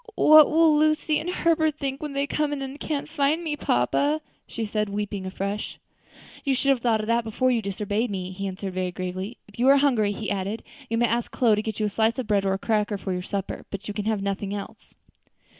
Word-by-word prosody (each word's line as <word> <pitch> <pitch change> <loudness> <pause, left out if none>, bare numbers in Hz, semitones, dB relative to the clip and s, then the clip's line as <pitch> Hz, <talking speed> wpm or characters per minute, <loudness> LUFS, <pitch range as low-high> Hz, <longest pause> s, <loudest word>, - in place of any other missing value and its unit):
"What 310 -1 +8
will 320 -1 +5
Lucy 310 0 +2
and 330 - -4
Herbert 320 -4 +1
think 275 -1 -3
when 300 -2 -5
they 280 0 0
come 300 +1 -1
in 280 -2 -3
and 270 +2 -7
can't 295 -2 -3
find 305 +2 0
me, 310 -3 -2
papa?" 285 - +1 0.3
she 230 - -4
said, 210 0 -1
weeping 200 -1 -3
afresh. 200 +2 -4 0.7
"You 275 -2 +1
should 275 +2 0
have 270 -2 +4
thought 230 -2 +1
of - - -4
that 235 +1 +1
before 240 +3 +1
you 235 -2 +1
disobeyed 205 +3 -2
me," 185 -2 -4
he 195 +1 -4
answered 190 0 -5
very 185 -1 -2
gravely. 185 +5 -5
"If 205 +2 -16
you 250 - +3
are 275 +1 +7
hungry," 245 -8 +3
he 210 +1 -4
added, 200 +3 -3 0.3
"you 230 - 0
may 240 - +3
ask 235 0 -1
Chloe 230 -4 +3
to 210 - -1
get 220 -1 -5
you 215 - +1
a - - 0
slice 225 +4 +1
of 255 - -2
bread 205 -2 +1
or 190 - +2
a - - 0
cracker 210 0 0
for 190 -1 -4
your 180 - -2
supper, 195 +1 -5
but 200 0 -6
you 210 - -4
can 210 0 -4
have 215 -2 0
nothing 200 0 -2
else." 200 - -9
220 Hz, 240 wpm, -25 LUFS, 200-275 Hz, 0.7 s, What